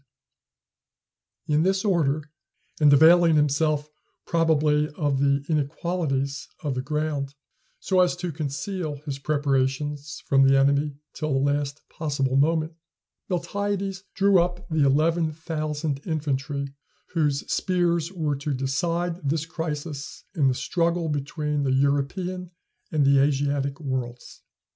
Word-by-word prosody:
] - - -55
In 150 - +4
this 190 +3 +1
order, 155 -6 +2 0.6
and 150 -2 +6
availing 165 +3 +7
himself 150 0 +2 0.4
probably 155 -2 +2
of 145 -5 0
the 140 0 +2
inequalities 145 -2 -1 0.2
of 145 -3 -1
the 130 - -2
ground, 145 -1 -2 0.4
so 190 -1 +1
as 180 -1 +4
to 180 -1 -4
conceal 155 +2 -3
his 140 -2 -4
preparations 145 0 -1
from 135 -1 +4
the 135 0 +6
enemy 140 +1 +2 0.2
till 155 -1 -3
the 135 +1 +2
last 145 0 -3
possible 140 -4 -1
moment, 155 +3 +2 0.6
Miltiades 195 +1 -2
drew 195 -2 +5
up 175 0 -3
the 160 -3 +2
eleven 160 +3 +2
thousand 155 -2 -3
infantry 140 -3 -2 0.4
whose 150 -4 +1
spears 175 -2 +1
were 155 -6 -1
to 140 +1 -3
decide 165 +4 -1
this 155 +1 0
crisis 150 -3 -5
in 150 -7 +2
the 130 - +2
struggle 170 +2 0
between 150 +1 -2
the 135 -2 +1
European 145 +7 0 0.4
and 150 -3 +2
the 140 0 +5
Asiatic 140 0 +1
worlds. 130 -4 -5
150 Hz, 125 wpm, -25 LUFS, 140-165 Hz, 0.6 s, availing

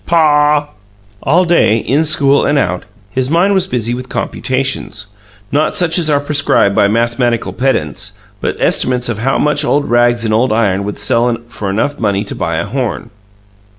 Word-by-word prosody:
"PAW!" 150 -3 +3 0.5
All 175 +6 +2
day, 170 -10 +3
in 140 +7 0
school 140 -2 +3
and 145 - +1
out, 90 -9 -1 0.3
his 130 +2 -1
mind 175 +6 +2
was 190 -2 +1
busy 120 -1 -2
with 125 +1 -6
computations 130 -5 -3 0.5
not 150 +2 +1
such 175 -1 +2
as 160 -3 0
are 145 -1 +3
prescribed 145 -8 +2
by 100 - +4
mathematical 115 +2 0
pedants, 125 - -2 0.3
but - - -3
estimates 125 -1 +1
of 110 -3 -3
how 135 +4 0
much 150 0 +1
old 145 0 0
rags 120 0 +2
and 110 - 0
old 120 +3 +2
iron 100 -3 +1
would 105 - -5
sell 120 0 +1
for 105 -4 -5
enough 110 +9 -1
money 100 -2 0
to 100 - -7
buy 85 -2 -3
a - - -2
horn. 125 +2 -4
125 Hz, 175 wpm, -14 LUFS, 110-145 Hz, 0.5 s, by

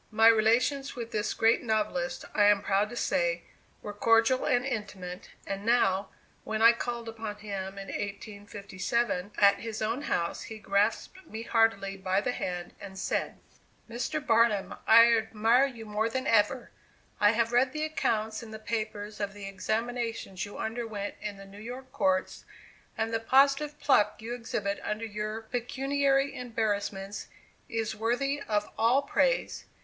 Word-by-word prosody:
My 225 0 +5
relations 235 +5 +2
with 235 -2 -6
this 210 0 -1
great 225 +1 +3
novelist, 230 +4 -1
I 205 - +4
am 205 -1 +4
proud 200 +1 +1
to 240 - -8
say, - - 0 0.4
were 205 - -5
cordial 230 +4 +3
and 245 0 +2
intimate; 195 -7 -5 0.2
and 195 0 -4
now, 200 -4 +2 0.3
when 220 0 -3
I 230 +1 +8
called 235 0 -4
upon 225 -2 -5
him, 200 -2 -6
in 195 0 -7
1857, 205 0 -3
at 200 -1 +5
his 225 -1 -5
own 225 +5 -1
house 170 - -1
he 220 - -8
grasped 210 - 0
me 220 +1 -6
heartily 225 -4 +1
by 190 0 +1
the 230 - -1
hand 180 -6 -4
and 190 -1 -9
said: - - -2 0.5
"Mr. 245 +6 -3
Barnum, 225 -4 +3
I 230 +1 +8
admire 225 +4 +3
you 235 -4 -9
more 215 +1 -1
than 260 +3 -3
ever. 230 +1 +2 0.5
I 210 +1 +5
have 230 +1 +1
read 250 +2 +4
the 305 +2 -2
accounts 220 -8 -1
in 230 - -10
the 220 - -7
papers 215 -1 -4
of 205 -1 -3
the 200 -1 -7
examinations 225 0 -3
you 205 - -10
underwent 220 -3 -4
in 210 -1 -5
the 195 - -11
New 200 +1 -12
York 255 +3 -8
courts, 280 0 0 0.5
and 225 0 -1
the 225 - +1
positive 275 +5 +3
pluck 240 -7 +3
you 225 +2 -5
exhibit 210 -4 -3
under 215 +2 -3
your 215 +1 -4
pecuniary 275 +4 0
embarrassments 205 -4 -3 0.4
is 225 -1 -2
worthy 245 +6 0
of 210 -2 0
all 240 +5 +4
praise. - - 0
225 Hz, 155 wpm, -29 LUFS, 205-240 Hz, 0.5 s, I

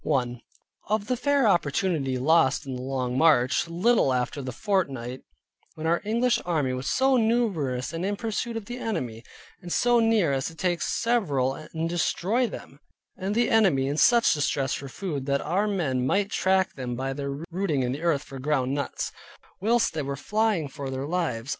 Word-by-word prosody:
1. 125 -5 -1 0.5
Of 215 0 0
the 250 - 0
fair 280 0 +2
opportunity 155 -6 +1
lost 150 +1 +3
in 135 -1 -5
the 125 - -5
long 130 -1 -2
march, 145 -3 +4
a - - -14
little 180 - +3
after 125 +3 -1
the 130 -1 -5
fort 190 - 0
fight, 125 0 -6 0.5
when 155 - -6
our 170 +1 +2
English 235 +3 +1
army 150 -7 0
was 130 +1 -3
so 265 0 +3
numerous, 190 - 0
and 165 +2 -3
in 205 +2 0
pursuit 225 +2 -3
of 220 - -6
the 245 +3 -6
enemy, 125 - -3 0.4
and 175 -1 -8
so 240 +4 +3
near 225 -10 +3
as 135 -1 -1
to 165 - -8
take 175 0 -1
several 170 - +1
and 160 +3 -5
destroy 190 +7 0
them, 140 -8 -10 0.4
and 195 +3 -3
the 240 +1 +2
enemy 190 -12 +4
in 140 - -1
such 235 +8 +5
distress 140 -2 0
for 140 - -5
food 145 -5 -4
that 140 0 +1
our 190 +7 0
men 150 -11 0
might 200 +6 +1
track 190 0 +2
them 125 -2 -4
by 135 +2 -3
their 140 0 -4 0.2
rooting 170 -7 0
in 125 - -1
the 140 +4 -4
earth 160 -4 +1
for 135 - -9
ground 135 -1 0
nuts, 140 0 -3 0.5
whilst 230 +2 +2
they 155 - -2
were 140 0 -3
flying 210 0 0
for 135 0 -6
their 130 +1 -3
lives. 150 -8 -2
160 Hz, 190 wpm, -26 LUFS, 135-205 Hz, 0.5 s, such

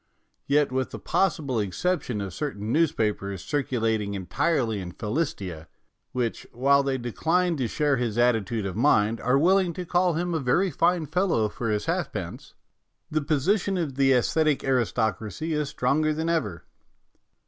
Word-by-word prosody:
Yet, 145 0 +3
with 130 0 -1
the - - -7
possible 150 -10 0
exception 120 - -1
of 95 -3 -5
certain 110 -6 -4
newspapers 110 - 0
circulating 115 -7 -1
entirely 110 - 0
in 90 -1 -7
Philistia, 105 - -3 0.4
which, 120 -3 -2
while 140 +3 +3
they 135 -1 -1
decline 165 +9 0
to 130 -4 0
share 145 +2 +1
his 120 -2 -2
attitude 115 -3 +1
of 95 -2 -4
mind, 110 -3 +3
are 125 +3 +3
willing 180 +3 +3
to 180 +2 -5
call 180 0 +2
him 175 +2 -1
a 160 - 0
very 170 +9 +1
fine 170 0 +2
fellow 160 - +1
for 115 +2 -4
his 105 -1 -1
halfpence, - - -4 0.6
the 155 0 +1
posi 155 +7 +1
tion 195 0 -2
of 160 -6 -2
the 135 0 +3
aesthetic 150 +4 +2
aristocracy 120 - -1
is 150 -2 -1
stronger 150 +2 +1
166 155 - 0
MONOLOGUES - - -9
than 160 +1 -1
ever. 105 - -1
135 Hz, 160 wpm, -26 LUFS, 110-160 Hz, 0.6 s, Yet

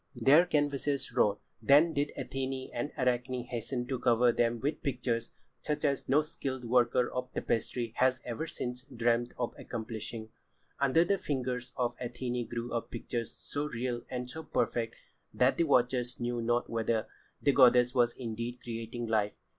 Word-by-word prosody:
Their 140 +9 +6
canvases 145 -3 0
wrought, 105 0 +2 0.2
then 150 +4 +6
did 145 0 0
Athené 130 0 -3
and 120 +5 -2
Arachne 125 0 0
hasten 120 +1 -3
to 130 0 -3
cover 120 0 +4
them 120 0 +1
with 145 +6 -2
pictures 120 -5 -2 0.3
such 150 +1 -1
as 140 -2 0
no 145 +3 +5
skilled 130 -5 -5
worker 125 +1 +3
of 125 0 -4
tapestry 115 0 -1
has 130 0 +3
ever 125 +7 -3
since 125 -4 -5
dreamed 120 -2 0
of 120 -1 -2
accomplishing. 110 -1 -6 0.5
Under 140 +5 +4
the 200 +2 +1
fingers 125 -3 -2
of 120 -1 0
Athené 120 0 -3
grew 120 0 -4
up 115 - -2
pictures 115 0 -4
so 145 +1 -4
real 120 -2 -3
and 125 -1 -3
so 160 +6 -6
perfect 115 -5 -1 0.4
that 125 +1 +3
the 170 - +3
watchers 125 -3 +2
knew 120 0 -1
not 120 +1 +1
whether 115 -1 0 0.3
the 140 - +3
goddess 125 -2 +6
was 120 -2 +3
indeed 115 0 -4
creating 115 +1 -4
life. 105 -2 +1
125 Hz, 160 wpm, -31 LUFS, 120-135 Hz, 0.5 s, Their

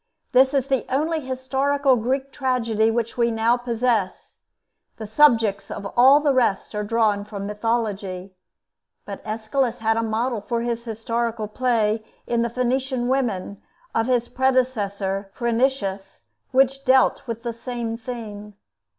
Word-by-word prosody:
This 265 +2 +4
is 270 -2 +2
the 270 -2 0
only 315 +5 0
historical 265 +1 +1
Greek 265 +4 -1
tragedy 230 -5 +1
which 230 +1 -2
we 235 0 +3
now 225 +1 +2
possess: 235 -4 -2 0.6
the 220 - -6
subjects 225 -4 +3
of 200 - -6
all 265 +4 +7
the 295 -2 +2
rest 235 -7 +1
are 210 0 -2
drawn 210 -1 +1
from 205 -1 -6
mythology. 205 -4 -2 0.7
But 200 -1 -7
Aeschylus 225 +3 -1
had 225 -1 +1
a - - +2
model 225 +1 -1
for 230 +3 -2
his 235 0 -3
historical 230 0 -2
play 220 -2 0 0.2
in 235 -1 0
the 235 - 0
'Phoenician 250 +1 -1
Women' 220 -7 -1 0.3
of 225 +1 +1
his 245 -2 +1
predecessor 205 -7 0
Phrynichus, 225 - -1 0.2
which 270 +1 +2
dealt 260 -1 +3
with 230 0 -5
the 235 -1 -3
same 230 -1 -4
theme. 215 -4 -8
235 Hz, 140 wpm, -23 LUFS, 215-255 Hz, 0.7 s, all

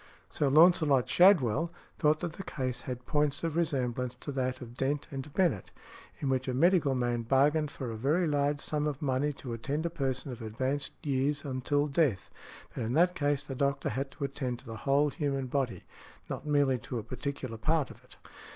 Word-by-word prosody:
Sir 145 - +1
Launcelot 155 -3 +5
Shadwell 165 - +4 0.3
thought 155 -1 +3
that 175 -3 -3
the 195 - -7
case 130 -7 -3
had 125 -1 -6
points 150 0 0
of 165 -2 -1
resemblance 125 -6 -1
to 145 - -5
that 130 -1 -1
of 120 -2 -9
Dent 135 +3 -1
v. 135 - -5
Bennett, 155 - +1 0.5
in 140 - -3
which 130 0 0
a 130 - -1
medical 160 -2 +4
man 120 -1 0
bargained 145 +5 +3
for 125 -4 -5
a - - -5
very 145 +10 +1
large 145 -1 +1
sum 150 0 -1
of 145 -2 -3
money 140 +1 0
to 125 -3 -7
attend 140 +8 -2
a 170 - -1
person 135 -4 -2
of 125 -1 -8
advanced 130 +6 -2
years 145 +1 0
until 140 +2 0
death; 140 - 0 0.4
but - - -5
in 115 +2 -2
that 175 +4 +4
case 145 -4 0
the 135 - -5
doctor 140 +1 0
had 135 +4 -2
to 145 - -8
attend 135 -3 -2
to - - -17
the 115 - -7
whole 140 +4 +2
human 140 -4 -1
body, 130 -2 -2 0.5
not - - -5
merely 140 -3 +3
to 120 - -5
a 110 - -4
particular 125 0 -5
part 155 +3 +1
of - - -15
it. - - -18
140 Hz, 195 wpm, -30 LUFS, 130-150 Hz, 0.5 s, Launcelot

